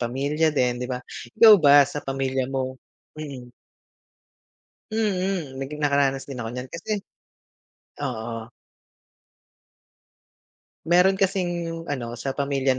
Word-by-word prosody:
pamilya 140 +6 0
din, 125 -4 0
'di 125 - -2
ba, 125 - -2 0.4
ikaw 220 -2 +9
ba 145 -1 +7
sa 145 +2 -5
pamilya 135 -1 -2
mo 130 -1 -3 0.4
mm. 130 -5 -8 1.4
Mm, 185 -10 -1
naging 150 +3 -6
nakaranas 140 -2 +2
din 130 -3 -7
ako 115 - -4
niyan 125 +2 -6
kasi. 195 +4 -4 1.0
Oo. 115 +1 -5 2.4
Meron 180 +3 +4
kasing 175 -4 -1
ano 120 -4 -4
sa 135 +3 -4
pamilya 135 -2 0
140 Hz, 110 wpm, -24 LUFS, 130-165 Hz, 2.4 s, ikaw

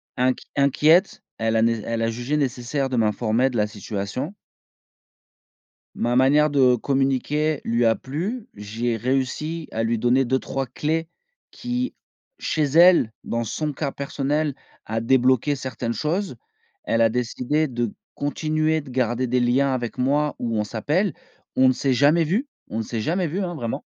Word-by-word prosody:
Inq 130 0 +1
inquiète, 150 +7 +3 0.2
elle 115 0 +1
a 110 - +3
né 115 0 +3
elle 115 0 -2
a 115 - +1
jugé 120 +6 -2
nécessaire 135 0 -1
de 130 - -3
m'informer 115 +3 +2
de 120 - -4
la 105 -1 +2
situation. 105 - -5 1.6
Ma 120 +1 0
manière 145 +4 +4
de 130 -3 +4
communiquer 135 +4 0
lui 115 +1 +1
a 115 -1 +4
plu. 190 - -4
J'ai 115 +3 -3
réussi 135 +7 -2
à 115 - -1
lui 115 0 0
donner 125 +3 +3
2-3 130 +1 -1
clés 160 +6 -2 0.4
qui, 250 +1 -3 0.4
chez 155 - -1
elle, 165 -3 +6
dans 115 0 -2
son 150 +6 -2
cas 140 0 -3
personnel, 140 +2 -1 0.3
a 110 +1 -2
débloqué 130 +3 +3
certaines 125 -3 -4
choses. 170 - -2 0.5
Elle 115 - +1
a 115 - +6
décidé 125 +6 -1
de 120 -4 -2 0.2
continuer 155 +2 0
de 140 -3 -11
garder 125 0 0
des 125 +1 +1
liens 130 +3 +2
avec 120 -1 -3
moi, 145 +4 +1
où 115 -2 -2
on 105 - +1
s'appelle. 150 - -1 0.4
On 130 0 +6
ne - - +5
s'est 130 0 0
jamais 150 +6 +4
vus 215 - -1 0.2
on - - -4
ne - - 0
s'est 110 +1 -4
jamais 175 - 0
vus, 170 +6 -3
hein, 175 -2 -3
vraiment. 120 -7 -4
130 Hz, 165 wpm, -23 LUFS, 120-150 Hz, 1.6 s, elle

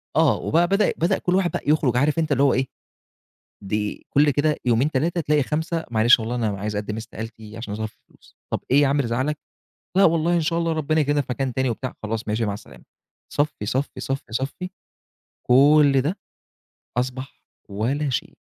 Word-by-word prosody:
آه 160 -3 +4
وبقى 170 +2 +2
بدأ 195 +3 +2
بدأ 170 - +2
كُلّ 180 - 0
واحد 185 -2 +2
بقى - - -3
يخرج 145 -5 +2
عارف 145 +5 +2
أنت 160 -2 -1
اللي 140 0 +3
هو 140 - +4
إيه، 130 +1 0 1.0
دي 105 +1 -3
كُلّ 145 +1 +4
كده 150 +2 +1
يومين، 125 +5 +2
3 165 +6 0
تلاقي 150 -1 +2
5 160 +3 -2
"معلش 115 +2 +5
والله 115 +2 -3
أنا 120 -2 0
عايز 105 +1 -3
أقدم 105 +1 -3
استقالتي 110 -1 -8
عشان 110 -3 -5
ظرف 110 0 -4
فلوس." - - -24 0.2
"طب - - 0
إيه 140 +2 +6
يا 145 - +4
عم 140 +2 +1
اللي 140 -4 +1
زعلك؟" 130 +6 -1 0.6
"لأ 195 - +6
والله 165 +1 +3
إن 170 - +3
شاء 165 +1 0
الله 165 -1 0
ربنا 155 0 +1
يكرمنا 145 0 +2
في 140 - -4
مكان 130 0 -1
تاني." 130 -1 +1
وبتاع، 130 +2 -4
خلاص 110 +1 -4
ماشي، 110 +2 0
مع 100 - -1
السلامة، 105 - -13 0.5
صفّي، 145 -7 -1
صفّي، 130 +3 -2
صفّي، 135 -3 -4
صفّي، 135 +10 -3 0.8
كُلّ 140 +2 +6
ده 165 +9 -2 0.8
أصبح 130 +2 -4 0.3
ولا 130 +9 -1
شيء. 125 - -3
135 Hz, 190 wpm, -23 LUFS, 115-155 Hz, 1.0 s, إيه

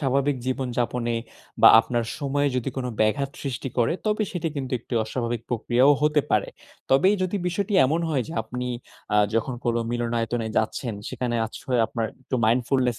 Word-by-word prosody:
স্বাভাবিক 140 0 +1
জীবনযাপনে 125 -2 -1 0.5
বা - - +11
আপনার 120 0 -2
সময়ে 145 0 0
যদি 125 +1 -1
কোন 130 -1 -2
ব্যাঘাত 135 +6 +1
সৃষ্টি 135 -1 -3
করে 115 - +3
তবে 215 0 +1
সেটি 170 -2 -2
কিন্তু 130 -2 -4
একটি 120 - -6
অস্বাভাবিক 115 0 -3
প্রক্রিয়াও 125 +4 +3
হতে 150 0 +4
পারে। - - +2 0.4
তবেই 185 +10 +5
যদি 185 +2 -1
বিষয়টি 200 +3 -2
এমন 160 +5 0
হয় 140 -5 +1
যে, - - -6
আপনি 125 +3 -5 0.5
আ - - +5 0.2
যখন 120 +3 0
কোন 120 -1 +1 0.2
মিলনায়তনে 120 -1 -1
যাচ্ছেন, 110 +1 -1
সেখানে 120 -2 -2
আশ্রয় 125 +2 -2
আপনার 115 -1 -2 0.2
একটু 130 - -2
mindfulness 125 +1 +1
125 Hz, 160 wpm, -25 LUFS, 120-140 Hz, 0.5 s, বা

